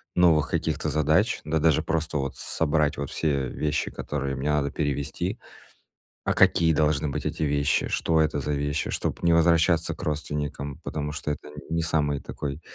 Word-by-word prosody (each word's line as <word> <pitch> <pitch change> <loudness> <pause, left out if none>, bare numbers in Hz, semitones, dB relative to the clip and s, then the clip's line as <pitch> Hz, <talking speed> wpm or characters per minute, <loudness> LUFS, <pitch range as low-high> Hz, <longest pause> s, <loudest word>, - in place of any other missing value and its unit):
новых 80 -5 +4
каких-то 80 -1 -1
задач, 80 - +2
да 80 +1 0
даже 80 -2 +3
просто 80 -1 -1
вот 70 -1 -3
собрать 75 -2 +1
вот 70 -1 -3
все 70 -5 0
вещи, 75 0 -1
которые 70 -2 -3
мне 70 +3 -2
надо 70 -2 +1
перевезти. 75 - -2 0.9
А - - +1
какие 80 -1 +4
должны 75 0 +1
быть 70 - -3
эти - - -3
вещи? 70 -1 +1
Что 80 -1 +1
это 75 -1 +1
за 75 - -2
вещи? 70 0 -1
Чтоб - - -2
не 85 - +5
возвращаться 85 0 +3
к - - -10
родственникам, 75 -2 -3
потому 75 -1 -3
что 75 0 -3
это 75 - -8
нь 75 +2 -7
не 85 - +1
самый 75 -4 +1
такой, 70 +3 -5
75 Hz, 175 wpm, -26 LUFS, 70-80 Hz, 0.9 s, не